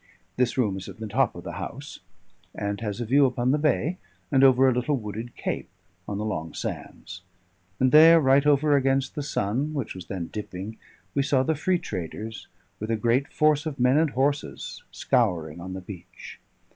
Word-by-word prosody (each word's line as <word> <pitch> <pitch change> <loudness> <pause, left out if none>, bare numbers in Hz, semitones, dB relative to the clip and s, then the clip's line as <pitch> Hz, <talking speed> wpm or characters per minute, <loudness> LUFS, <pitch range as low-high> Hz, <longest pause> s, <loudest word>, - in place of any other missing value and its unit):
This 125 0 0
room 105 -7 +1
is 95 - -8
in - - -9
the 110 - -6
top 125 +6 +1
of 85 - -9
the - - -6
house, 140 +9 -7 0.6
and 100 +1 -3
has 105 -1 -3
a 120 - -2
view 135 +4 +4
upon 125 0 0
the 150 - +2
bay, 155 +4 0 0.3
and 135 - +4
over 130 0 +6
a 130 - +4
little 125 +4 0
wooded 110 +1 -6
cape, - - -4 0.4
on 100 - -3
the 105 - -3
long 80 -7 -4
sands; 90 +2 -6 0.6
and 130 0 +3
there, 165 +2 +8
right 135 -1 +4
over 145 0 +4
against 135 0 +1
the 150 - -4
sun, 140 +2 -2
which 135 -6 -3
was 90 -2 -10
then 90 -4 -5
dipping, 105 +1 -6 0.4
we 140 - +2
saw 135 -1 +2
the 160 - +1
free 180 +5 +1
traders, 105 - -6 0.3
with 110 - -5
a 115 - +2
great 120 +5 +1
force 155 0 +2
of 140 -3 -5
men 125 +3 +4
and 160 -1 +2
horses, 140 +2 -2
scouring 85 -9 0
on 95 +1 -6
the 95 - -6
beach. 90 -1 -11
125 Hz, 195 wpm, -26 LUFS, 105-140 Hz, 0.6 s, there